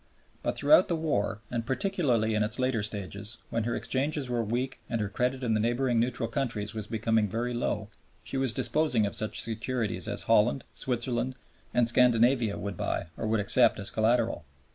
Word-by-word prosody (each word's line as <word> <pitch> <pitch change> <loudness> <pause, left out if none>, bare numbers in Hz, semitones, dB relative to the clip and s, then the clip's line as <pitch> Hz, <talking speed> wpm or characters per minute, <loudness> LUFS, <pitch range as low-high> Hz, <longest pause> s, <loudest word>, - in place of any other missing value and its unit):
But - - -1
throughout 310 - +5
the 170 - 0
war 145 -10 -1
and 120 -1 -2
particularly 130 - 0
in 105 - +1
its 105 - 0
later 130 -3 0
stages, 105 +1 -5
when 115 -1 -1
her 120 - -1
exchanges 135 -1 -1
were 120 -1 0
weak 125 +5 -2
and 115 - -1
her 105 -2 -2
credit 125 +5 -1
in 115 -3 +1
the 110 - +2
neighboring 120 +2 +1
neutral 120 0 -1
countries 115 -7 -2
was 110 -2 -5
becoming 110 -1 +1
very 120 +4 -2
low, 120 - -2 0.4
she - - -7
was 135 -2 +1
disposing 125 -2 +1
of 100 - -3
such 110 - -1
securities 115 0 -2
as - - -1
Holland, 115 +4 +3
Switzerland, 125 0 -2 0.4
and 120 -1 +2
Scandinavia 120 -2 +3
would 100 -3 -5
buy 85 - -2
or 110 - -4
would 110 0 +1
accept 105 +4 +5
as 100 - -2
collateral. 115 -4 +1
115 Hz, 185 wpm, -28 LUFS, 110-130 Hz, 0.4 s, throughout